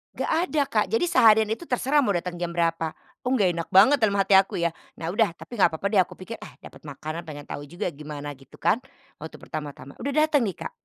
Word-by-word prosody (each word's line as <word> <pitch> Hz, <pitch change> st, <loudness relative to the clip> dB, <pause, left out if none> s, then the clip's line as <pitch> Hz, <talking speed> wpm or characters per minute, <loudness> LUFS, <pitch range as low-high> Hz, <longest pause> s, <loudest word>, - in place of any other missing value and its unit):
Enggak -, -, -2 dB, 0.2 s
ada, 305 Hz, -4 st, +1 dB
Kak, -, -, +1 dB
jadi 450 Hz, -6 st, +1 dB
seharian 220 Hz, -1 st, +5 dB
itu 325 Hz, +10 st, -4 dB
terserah 265 Hz, +4 st, +2 dB
mau 210 Hz, -9 st, +2 dB
datang 175 Hz, 0 st, -3 dB
jam 175 Hz, -, -1 dB
berapa, 165 Hz, -2 st, 0 dB, 0.3 s
"Oh 260 Hz, -, +2 dB
nggak 195 Hz, -7 st, +3 dB
enak 170 Hz, -1 st, -4 dB
banget," 215 Hz, +10 st, +6 dB
dalam 215 Hz, -3 st, +2 dB
hati 200 Hz, 0 st, +1 dB
aku 195 Hz, 0 st, +5 dB
ya. 170 Hz, -1 st, 0 dB, 0.2 s
Nah 165 Hz, 0 st, -4 dB
udah, 200 Hz, -3 st, +1 dB
tapi 240 Hz, +6 st, -10 dB
nggak 170 Hz, -4 st, +4 dB
papa 200 Hz, +5 st, -2 dB
deh 205 Hz, -, +4 dB
aku 185 Hz, -, +1 dB
pikir, 220 Hz, +5 st, -8 dB
"Ah, -, -, -11 dB
dapat -, -, -13 dB
makanan 155 Hz, +4 st, -6 dB
pengen 145 Hz, -2 st, -8 dB
tahu 145 Hz, 0 st, -7 dB
juga 175 Hz, +4 st, -4 dB
gimana," 145 Hz, -1 st, -7 dB
gitu 135 Hz, -2 st, -15 dB
kan 225 Hz, -, +1 dB, 0.4 s
waktu 160 Hz, +1 st, -8 dB
pertama-tama, 145 Hz, -2 st, -8 dB
udah 280 Hz, -, -3 dB
dateng 305 Hz, -6 st, +3 dB
nih, 190 Hz, -, -4 dB
Kak, -, -, -5 dB
185 Hz, 230 wpm, -25 LUFS, 160-225 Hz, 0.4 s, banget